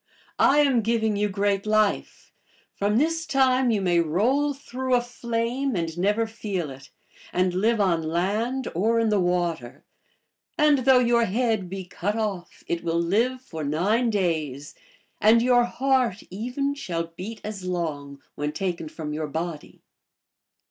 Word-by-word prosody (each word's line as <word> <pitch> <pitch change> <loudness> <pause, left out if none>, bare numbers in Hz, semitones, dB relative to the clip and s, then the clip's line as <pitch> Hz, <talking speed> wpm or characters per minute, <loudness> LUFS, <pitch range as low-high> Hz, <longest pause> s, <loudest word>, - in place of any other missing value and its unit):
I 290 +2 +5
am 270 -5 +3
giving 220 -1 +1
you 205 +1 0
great 200 +1 0
life. 215 -1 0 0.4
From 205 +2 0
this 325 +4 0
time 260 -2 +3
you 215 -3 +1
may 175 -2 +2
roll 230 - +1
through 260 -2 -2
a 245 - +3
flame 240 +2 -2
and 165 -2 -2
never 205 +5 +1
feel 200 -8 -4
it, 135 +1 -12 0.4
and 180 0 +1
live 220 +5 +1
on 180 -5 +2
land 205 +11 -1
or 225 +7 +2
in 225 -1 +2
the 210 -1 +2
water. 175 -8 -1 0.7
And 300 -2 +4
though 265 -1 +7
your 235 -1 +3
head 220 -3 0
be 190 0 -6
cut 200 +3 -3
off, 200 -6 -4
it 170 0 -3
will 165 0 0
live 230 +9 +1
for 160 -9 -6
nine 200 - +1
days, 155 - -2 0.5
and 220 +2 +6
your 245 0 +4
heart, 255 -5 0
even, 250 +8 -2
shall 170 -10 -4
beat 215 +6 -7
as 210 -3 -6
long 150 -6 -4
when 150 0 -3
taken 170 -2 -3
from 155 -1 -6
your 155 0 -3
body." 160 +1 -6
205 Hz, 155 wpm, -25 LUFS, 170-240 Hz, 0.7 s, though